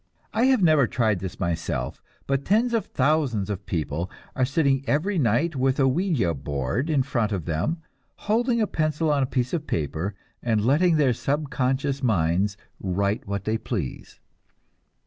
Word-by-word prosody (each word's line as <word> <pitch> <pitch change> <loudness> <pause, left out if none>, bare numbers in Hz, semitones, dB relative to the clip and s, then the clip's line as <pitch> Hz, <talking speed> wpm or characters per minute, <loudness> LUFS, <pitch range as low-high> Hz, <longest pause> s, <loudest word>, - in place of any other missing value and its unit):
I 225 +3 +3
have 260 -6 +4
never 155 -6 +5
tried 110 -4 +1
this 95 0 -6
myself, 85 -8 -2 0.2
but 135 0 0
tens 225 - +2
of 230 - 0
thousands 130 -8 +1
of 100 -1 -6
people 85 -2 -2 0.3
are 130 - +2
sitting 140 -1 +1
every 180 +6 +1
night 140 +6 +2
with 130 +1 +1
a 135 - +5
"ouija" 135 - +1 0.5
in 145 -5 +2
front 120 -5 -1
of 95 -6 -2
them, 90 - -1 0.3
holding 235 +3 +1
a 220 - +3
pencil 155 -3 0
on 145 -1 +2
a 130 - +1
piece 125 -1 -1
of 155 -3 -2
paper 80 +5 -2 0.3
and 110 -3 +1
letting 160 +6 +4
their 140 -5 +3
subconscious 140 0 -1
minds 95 -3 +1 0.2
write 100 +3 -1
what 100 -1 -3
they 110 +2 -1
please. 95 - -5
130 Hz, 160 wpm, -25 LUFS, 100-155 Hz, 0.5 s, never